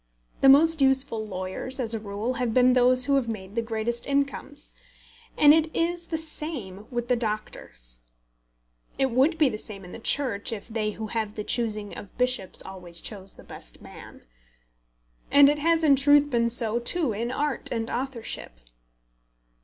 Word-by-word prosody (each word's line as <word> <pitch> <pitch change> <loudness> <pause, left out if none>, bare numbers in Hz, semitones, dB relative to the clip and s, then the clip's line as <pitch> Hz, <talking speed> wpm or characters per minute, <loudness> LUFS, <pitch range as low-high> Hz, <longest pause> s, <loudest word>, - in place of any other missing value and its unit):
The 270 - +7
most 315 +3 +6
useful 265 -5 +2
lawyers, 190 +7 -5
as 230 -3 -1
a 225 - -2
rule, 210 +4 -4
have 235 -3 -1
been 250 0 +5
those 250 0 +4
who 280 0 +3
have 260 -3 -1
made 195 -3 -6
the 230 - 0
greatest 230 +1 -3
incomes, 280 +1 -2 0.7
and 295 0 +7
it 320 0 +2
is 340 +1 -1
the 320 - -2
same 290 - -5
with 240 -1 -3
the 250 - +2
doctors. 210 - -5 1.0
It 265 -1 +1
would 275 +7 +2
be 310 -2 +4
the 215 -4 -3
same 195 -4 -7
in 180 - -11
the - - -9
Church 235 -4 -1
if 220 -3 -6
they 220 -2 -2
who 220 - -6
have 215 -1 -3
the 210 - -4
choosing 215 -3 -1
of 200 - -11
bishops 250 -7 -1
always 180 -3 -4
chose 195 -1 -6
the - - -15
best - - -12
man. - - -13 1.1
And 280 0 +7
it 295 0 0
has 330 +2 +2
in 290 -3 +6
truth 290 +1 +4
been 235 -1 +2
so 230 -1 +2
too 265 +1 0
in 230 +4 -3
art 285 +1 -2
and 225 -1 -2
authorship. 240 - -5
240 Hz, 175 wpm, -26 LUFS, 215-280 Hz, 1.1 s, The